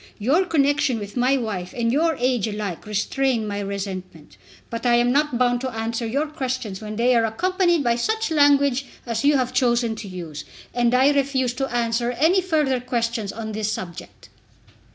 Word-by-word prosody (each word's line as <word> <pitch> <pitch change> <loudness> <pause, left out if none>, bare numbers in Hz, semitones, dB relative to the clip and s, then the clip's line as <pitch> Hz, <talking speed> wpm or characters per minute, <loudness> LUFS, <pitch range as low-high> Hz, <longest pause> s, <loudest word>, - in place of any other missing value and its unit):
Your 290 - +2
connection 285 -6 +2
with 205 -1 -7
my 255 +2 +3
wife 200 -7 -4
and 230 -1 +1
your 320 +3 +2
age 245 -4 0
alike 205 -4 -5
restrain 225 +2 0
my 205 0 -3
resentment. 190 -5 -6 0.4
But 230 0 -4
I 240 -1 +4
am 240 +1 +3
not 290 -2 +1
bound 245 0 +2
to 260 - -2
answer 230 0 -3
your 280 +7 0
questions 255 -9 -4
when 215 0 -6
they 245 +3 +3
are 230 - +4
accompanied 345 - +1
by 235 -1 +2
such 440 - -1
language 280 -3 +3 0.2
as 230 -2 -2
you 290 0 +4
have 255 -1 -1
chosen 240 -2 +2
to 210 - -7
use, 170 -5 -7 0.3
and 240 0 +2
I 265 +3 +5
refuse 270 -3 +1
to 270 +1 -3
answer 235 0 0
any 320 +10 +3
further 305 -8 +1
questions 235 -4 -2
on 220 -1 -6
this 215 0 -2
subject." 175 -5 -8
245 Hz, 180 wpm, -23 LUFS, 220-275 Hz, 0.4 s, I